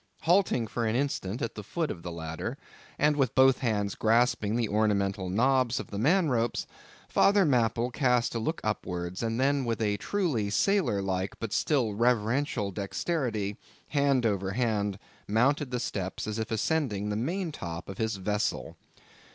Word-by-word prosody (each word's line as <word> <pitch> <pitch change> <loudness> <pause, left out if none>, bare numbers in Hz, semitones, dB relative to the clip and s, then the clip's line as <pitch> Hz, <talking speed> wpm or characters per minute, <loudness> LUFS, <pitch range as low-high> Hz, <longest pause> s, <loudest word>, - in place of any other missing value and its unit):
Halting 175 -8 +3
for 115 +1 -2
an 110 - 0
instant 125 -6 -1
at 115 - -3
the 105 - -7
foot 155 - -2
of 85 - -7
the 85 - -6
ladder, 80 -1 -5 0.4
and 150 +1 +3
with 135 -5 +1
both 130 0 +5
hands 105 -5 0
grasping 115 -1 +2
the 120 -2 +1
ornamental 100 -3 0
knobs 125 +4 +2
of - - -8
the 100 - -3
man 165 - +3
ropes, 120 -4 0 0.4
Father 200 -1 +4
Mapple 120 -3 +1
cast 125 -3 +2
a 115 - -1
look 160 +9 -2
upwards, 90 -4 -3
and 115 0 -1
then 140 +1 +2
with 115 -2 -2
a 105 -2 +1
truly 150 - -1
sailor 110 - +2
like 95 0 -2
but 115 -2 -4
still 130 -8 +1
reverential 115 0 +1
dexterity, 105 - -2 0.3
hand 140 -4 +2
over 100 -3 0
hand, 105 -4 0 0.3
mounted 135 +7 +2
the 125 -1 -2
steps 95 -5 -3
as 110 +1 -3
if 110 - -3
ascending 110 -4 0
the 105 - -1
main 165 - -2
top 85 - -6
of 95 - -8
his 110 -1 0
vessel. 105 +2 -2
115 Hz, 170 wpm, -28 LUFS, 100-135 Hz, 0.4 s, both